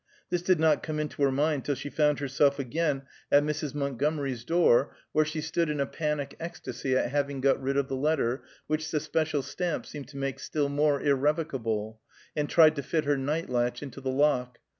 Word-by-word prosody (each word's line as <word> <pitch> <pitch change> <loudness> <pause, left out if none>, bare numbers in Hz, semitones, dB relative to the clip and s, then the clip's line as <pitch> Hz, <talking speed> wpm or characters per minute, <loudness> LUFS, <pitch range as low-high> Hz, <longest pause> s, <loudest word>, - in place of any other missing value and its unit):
This 175 -1 +1
did 180 -1 +3
not 155 -2 +4
come 155 -1 -3
into 150 -1 -4
her 140 -1 +4
mind 145 0 +1
till 145 - -1
she 145 +3 -6
found 150 -2 +2
herself 140 0 +2
again 140 +1 -1 0.3
at 145 - +6
Mrs. 150 -1 -3
Montgomery's 140 -2 -1
door, 155 -3 +3 0.2
where 155 - +3
she 155 +1 -3
stood 160 +1 0
in 150 -1 -2
a 140 - +2
panic 150 -1 -3
ecstasy 140 -5 -3
at 125 - 0
having 140 -1 -1
got 135 +1 +2
rid 135 +1 0
of 140 -1 +1
the 135 - -3
letter, 135 -3 +1 0.2
which 155 +1 -1
the 155 - 0
special 155 -1 -1
stamp 175 +4 -3
seemed 145 -4 -8
to 140 +1 -11
make 135 -1 -3
still 145 -2 -1
more 145 0 +2
irrevocable, 130 -7 0 0.3
and 150 -1 -1
tried 155 -2 +6
to - - 0
fit 155 +3 -1
her 145 0 +3
night 150 +5 -1
latch 120 +1 -1
into 135 -1 -8
the 130 - -2
lock. 130 -3 +1
145 Hz, 205 wpm, -28 LUFS, 135-155 Hz, 0.3 s, at